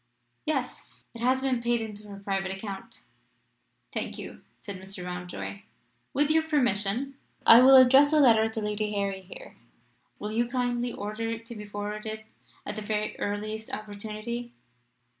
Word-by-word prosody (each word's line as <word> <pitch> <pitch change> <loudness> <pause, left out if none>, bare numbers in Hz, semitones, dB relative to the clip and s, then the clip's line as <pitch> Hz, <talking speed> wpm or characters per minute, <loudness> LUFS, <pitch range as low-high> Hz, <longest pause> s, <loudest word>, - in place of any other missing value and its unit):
"Yes; 270 -5 -1 0.3
it 230 - -9
has 260 +2 +3
been 260 -3 0
paid 240 0 +1
into 210 -1 -7
her 200 -1 -9
private 195 -1 -2
account." 195 +3 -7 0.9
"Thank - - -3
you," - - -8 0.2
said 195 -3 -8
Mr. 190 -1 -7
Mountjoy. 180 +2 -5 0.5
"With 290 +2 +2
your 320 +1 +5
permission, 255 - 0 0.3
I 230 +2 +10
will 265 +1 +9
address 265 +3 +8
a 310 - +5
letter 225 -5 +6
to 220 0 -4
Lady 210 0 -1
Harry 200 -1 -1
here. 350 - -12 0.6
Will 210 - -5
you 235 +2 +1
kindly 245 -1 -1
order 215 +2 -4
it 230 0 -5
to 235 0 -8
be 210 -1 -7
forwarded 210 +1 -5 0.4
at 205 - -4
the 215 - -4
very 210 0 -2
earliest 215 +2 -3
opportunity?" 215 +3 -5
220 Hz, 155 wpm, -28 LUFS, 205-245 Hz, 0.9 s, I